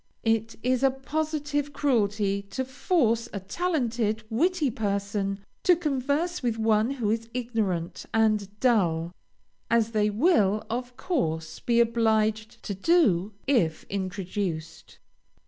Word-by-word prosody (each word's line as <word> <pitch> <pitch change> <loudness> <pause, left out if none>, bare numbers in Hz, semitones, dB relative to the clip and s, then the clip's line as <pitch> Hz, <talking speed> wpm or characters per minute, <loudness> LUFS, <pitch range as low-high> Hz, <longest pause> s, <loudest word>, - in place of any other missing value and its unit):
It 225 0 +1
is 255 0 +1
a 270 - +5
positive 290 +1 -2
cruelty 210 -8 +1
to 260 +6 -3
force 245 -4 +1
a 200 - -3
talented, 235 - -1
witty 315 +3 +1
person, 200 -1 -2 0.2
to 360 - +5
converse 300 +2 -1
with 235 -3 -1
one 220 0 +2
who 240 -6 -1
is 230 +1 -2
ignorant 215 -9 -2
and 215 -2 +1
dull, 175 -9 +2 0.6
as 230 -1 +2
they 210 -1 +2
will, 215 - +2
of 245 +1 -4
course, 160 - -2
be 235 -1 +1
obliged 220 -2 +1
to 205 - -3
do, 210 - +2
if 215 - +1
introduced. 185 -4 -4
225 Hz, 120 wpm, -27 LUFS, 200-265 Hz, 0.6 s, a